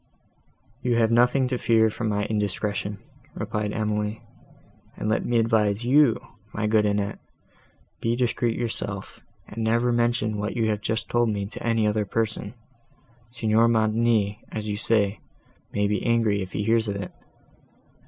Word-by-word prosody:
"You 125 -2 +1
have 115 -1 +3
nothing 125 +3 +4
to 125 -2 -1
fear 110 -1 +3
from 110 0 -3
my 105 0 0
indiscretion," 105 -1 -2 0.4
replied 105 -1 -2
Emily, 105 0 -2 0.7
"and - - -3
let 110 - +1
me 120 - +1
advise 110 -1 +2
you, 135 -1 +4 0.4
my 110 - -1
good 105 0 +3
Annette, 100 0 -1 0.8
be 115 +1 +1
discreet 120 -1 0
yourself, 120 -2 -4 0.3
and 115 +2 -5
never 115 +2 +2
mention 120 -3 +1
what 105 +1 -3
you 110 -1 +1
have 105 -1 -1
just 110 +2 -2
told 120 -1 +2
me 100 -2 -2
to 100 - -8
any 115 -2 +1
other 105 0 +1
person. 110 +1 -2 0.8
Signor 115 -1 +2
Montoni, 110 -2 +2
as 110 -1 -4
you 105 - -1
say, 105 -1 +1 0.5
may 105 0 0
be 105 -1 0
angry 115 -4 +2
if 95 -1 -6
he 105 - -1
hears 115 +1 +2
of 100 - -2
it. 100 -2 -5
110 Hz, 155 wpm, -25 LUFS, 105-115 Hz, 0.8 s, nothing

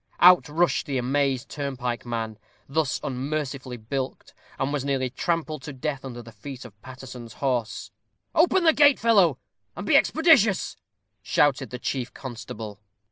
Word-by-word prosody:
Out 180 -3 +7
rushed 170 +2 +1
the 140 -2 -1
amazed 135 0 0
turnpike 125 -4 -4
man, 110 -2 -3 0.3
thus 145 0 0
unmercifully 135 -1 -3
bilked, 130 +4 -5 0.2
and 135 +2 -1
was 145 -3 -1
nearly 135 -2 -1
trampled 155 +1 -2
to 145 +2 -7
death 140 +1 -3
under 120 -3 -7
the 115 - -12
feet 135 +1 -9
of 100 -4 -14
Paterson's 125 -2 -10
horse. 125 -5 -2 0.4
"Open 345 +2 +4
the 320 -1 +6
gate, 290 -2 +6
fellow, 195 - +4 0.4
and - - -6
be - - +3
expeditious," 290 - +4 0.5
shouted 135 -4 +2
the 125 - -5
chief 125 0 -3
constable. 110 -5 -7
135 Hz, 145 wpm, -25 LUFS, 125-155 Hz, 0.5 s, Out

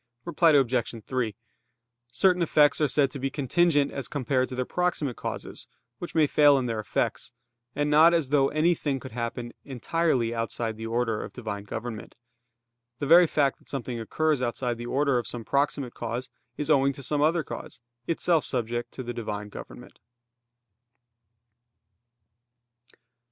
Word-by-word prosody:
Reply 170 -1 +3
Obj. 125 -4 +1
3: 125 -5 -2 0.8
Certain 180 +8 +3
effects 150 -2 +4
are 150 - +4
said 140 -2 +2
to 140 - -6
be 135 +1 -1
contingent 145 +2 +2
as 140 - -5
compared 130 -2 0
to 130 - -6
their 125 0 -1
proximate 170 -7 -1
causes, - - -6 0.3
which 175 - -7
may 160 -2 +5
fail 145 -1 +5
in 130 - -1
their 115 -2 -2
effects; 110 +3 -2 0.4
and 145 +1 0
not 155 +3 +6
as 165 -6 +1
though 140 -1 +3
anything 155 -3 +1
could 130 - -9
happen 120 +1 -4
entirely 130 -2 0
outside 115 0 -3
the 110 +1 -6
order 115 -1 -1
of - - -9
Divine 105 -4 -6
government. 110 +2 -6 0.8
The 145 - -3
very 170 +4 +7
fact 140 -3 +1
that - - -18
something 125 -3 -4
occurs 150 +5 0
outside 120 -1 -2
the 120 - -5
order 140 -1 +2
of 120 - -6
some 120 -2 -7
proximate 140 -2 0
cause, 120 +2 -5 0.3
is 150 +1 -1
owing 140 -1 +4
to 140 - -10
some 145 +3 0
other 160 +2 +2
cause, - - -8 0.3
itself 165 -1 +2
subject 120 -1 -2
to 130 - -6
the 120 0 -5
Divine 105 -3 -5
government. - - -11
135 Hz, 155 wpm, -27 LUFS, 120-150 Hz, 0.8 s, very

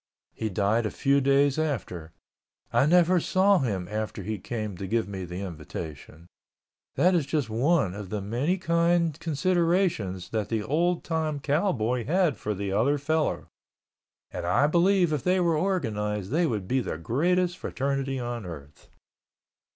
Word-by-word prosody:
He 110 - -3
died 105 +3 +1
a - - -2
few 140 +3 +2
days 140 +1 +3
after. 100 - -3 0.6
I 140 - +4
never 175 +2 +5
saw 190 +3 +3
him 100 - -2
after 105 -1 -4
he 105 +1 -4
came 110 -1 -4
to 95 - -5
give 115 +2 0
me 95 -2 -5
the 90 +2 -6
invitation. 80 -2 -8 0.7
That 180 +2 +4
is 165 -6 +1
just 140 -7 -1
one 130 - +2
of 100 -1 -7
the 105 - -2
many 120 - -1
kind 170 -2 +2
considerations 165 - 0
that 110 -2 -2
the 110 -2 -1
old 170 +7 0
time 160 -3 -2
cowboy 135 - 0
had 175 -1 +2
for 105 0 -3
the 100 0 -3
other 120 +9 +2
fellow—and 155 +2 -5
I 145 - +3
believe 175 +1 +3
if 145 - -2
they 185 +1 +2
were 170 -2 +2
organized 105 - -1
they 165 +3 +2
would 105 -7 -3
be 130 +5 +1
the 115 - -3
greatest 175 - 0
fraternity 135 -1 -2
on 120 -2 -4
earth. 75 -7 -11
135 Hz, 155 wpm, -27 LUFS, 105-170 Hz, 0.7 s, never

